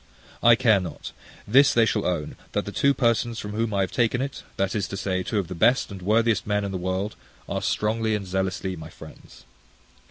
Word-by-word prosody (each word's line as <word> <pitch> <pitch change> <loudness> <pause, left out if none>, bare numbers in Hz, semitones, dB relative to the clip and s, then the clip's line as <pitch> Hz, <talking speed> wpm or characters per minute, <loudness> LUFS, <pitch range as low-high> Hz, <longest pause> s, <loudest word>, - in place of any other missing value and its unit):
I 120 0 +7
care 115 -4 +4
not: 85 -5 -7 0.4
this 135 +6 +5
they 115 -1 +5
shall - - 0
own, 85 -5 -2 0.2
that - - -1
the - - -5
two 140 - +3
persons 115 -1 +1
from 105 -1 -5
whom 110 +1 -1
I 100 -1 +1
have 95 - -1
taken 120 +1 +1
it, 135 +1 -4 0.2
that 95 0 0
is 100 -4 -1
to 100 - -6
say, 95 -1 -1
two 105 +4 -3
of 95 -4 -1
the 90 - -6
best 115 +7 +2
and 95 -2 -8
worthiest 110 +4 +2
men 105 0 +1
in 100 - -4
the 95 - -3
world, 95 +3 -2 0.3
are - - -2
strongly 110 +1 0
and 100 -2 -4
zealously 95 0 -2
my 80 - -9
friends. - - -14
105 Hz, 220 wpm, -25 LUFS, 95-115 Hz, 0.4 s, I